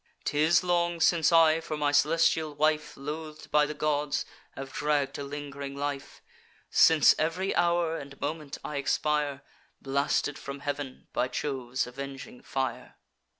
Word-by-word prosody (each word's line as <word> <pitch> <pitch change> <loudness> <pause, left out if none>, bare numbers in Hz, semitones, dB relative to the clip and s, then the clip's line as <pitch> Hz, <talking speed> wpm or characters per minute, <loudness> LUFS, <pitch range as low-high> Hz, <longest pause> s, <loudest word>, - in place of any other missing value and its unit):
'Tis 155 +3 +3
long 175 -1 +1
since 165 0 +4
I, 165 -1 +6
for 155 -1 -4
my 145 -1 +1
celestial 155 0 +2
wife 155 +1 0
Loath'd 155 +2 -7
by 150 0 +4
the 150 - -5
gods, 150 -1 0 0.3
have 135 0 -7
dragg'd 145 -2 0
a - - -3
ling'ring 140 -1 -6
life; 140 -1 -5 0.5
Since 160 -3 +6
ev'ry 165 +5 0
hour 170 -1 +2
and 140 0 -11
moment 150 0 -4
I 150 - -4
expire, 145 0 0 0.4
Blasted 140 +1 0
from 140 0 -7
heav'n 145 -2 -5
by 125 - +1
Jove's 130 -2 -2
avenging 135 0 -8
fire. 125 -2 -4
145 Hz, 140 wpm, -28 LUFS, 140-155 Hz, 0.5 s, I